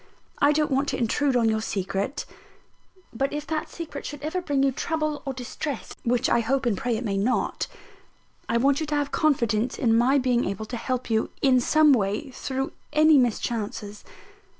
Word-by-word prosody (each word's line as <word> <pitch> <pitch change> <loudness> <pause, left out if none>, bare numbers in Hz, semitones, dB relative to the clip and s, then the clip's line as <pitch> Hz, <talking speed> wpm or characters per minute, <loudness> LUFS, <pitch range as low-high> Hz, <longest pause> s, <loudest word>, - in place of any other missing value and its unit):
I 285 - +5
don't 300 0 +1
want 270 +2 +1
to - - -2
intrude 260 +3 +1
on 235 -2 +3
your 220 0 +1
secret; 195 +3 -2 0.9
but 270 +4 -1
if 295 0 -4
that 310 0 -3
secret 315 -4 -7
should 290 -1 -7
ever 320 +4 -2
bring 280 -5 0
you 275 - +3
trouble 305 +2 -2
or 270 - -1
distress 260 +2 -5
(which 240 0 +1
I - - +3
hope 260 +3 0
and 235 -4 +2
pray 230 +3 -1
it 240 - -4
may 200 -2 -1
not), 230 +6 0 0.8
I 230 - +2
want 275 +3 +3
you 315 - -3
to 300 - -1
have 290 -1 -1
confidence 235 -6 +1
in 225 -3 +2
my 250 +4 +4
being 250 -2 +2
able 200 +3 -3
to 240 - -6
help 255 0 -3
you, 220 0 +1
in 260 -2 +5
some 305 +3 +5
way, 210 +4 -1
through 265 +1 -3 0.2
any 310 -1 +6
mischances. 215 -3 -2
255 Hz, 190 wpm, -25 LUFS, 230-290 Hz, 0.9 s, any